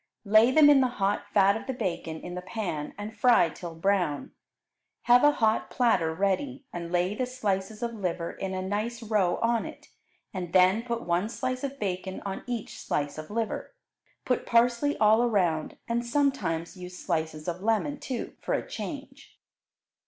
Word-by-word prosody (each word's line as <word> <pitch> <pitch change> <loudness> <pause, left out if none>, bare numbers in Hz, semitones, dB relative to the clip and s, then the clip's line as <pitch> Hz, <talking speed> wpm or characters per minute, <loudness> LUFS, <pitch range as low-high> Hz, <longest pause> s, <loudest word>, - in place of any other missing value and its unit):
Lay 215 +4 +6
them 295 +3 +6
in 285 -2 +7
the 255 - +3
hot 200 +1 0
fat 200 0 +5
of 240 +4 -6
the 265 - -2
bacon 165 -6 -3
in 175 - -7
the 180 - -4
pan 180 -6 -4
and 210 +2 -6
fry 240 -9 +5
till 165 +2 -8
brown. 175 -4 0 0.7
Have 245 +2 +6
a 295 0 +6
hot 220 -4 +1
platter 210 -10 +2
ready, 200 - -1
and 170 -1 -5
lay 180 +2 +1
the 250 +4 -2
slices 215 -3 -2
of 235 0 -2
liver 180 -5 -3
in 190 -1 -5
a 185 - -3
nice 215 +5 -3
row 210 -5 +2
on 230 0 +2
it, - - -10 0.4
and 180 -3 -5
then 185 +3 +5
put 235 -1 -3
one 175 +5 0
slice 255 +2 -3
of 275 0 -4
bacon 190 -1 -3
on 195 -1 -4
each 240 -3 -5
slice 145 +1 -2
of 155 - -8
liver. 225 - -3 0.5
Put 250 - 0
parsley 240 +4 +3
all 220 +1 +5
around, 180 -10 +1
and 235 +1 0
sometimes 235 - 0
use 180 0 -9
slices 160 -3 -3
of 175 +1 -3
lemon, 225 +7 0
too, 255 -3 -5
for - - -2
a - - -3
change. 275 -2 -8
205 Hz, 175 wpm, -28 LUFS, 180-240 Hz, 0.7 s, in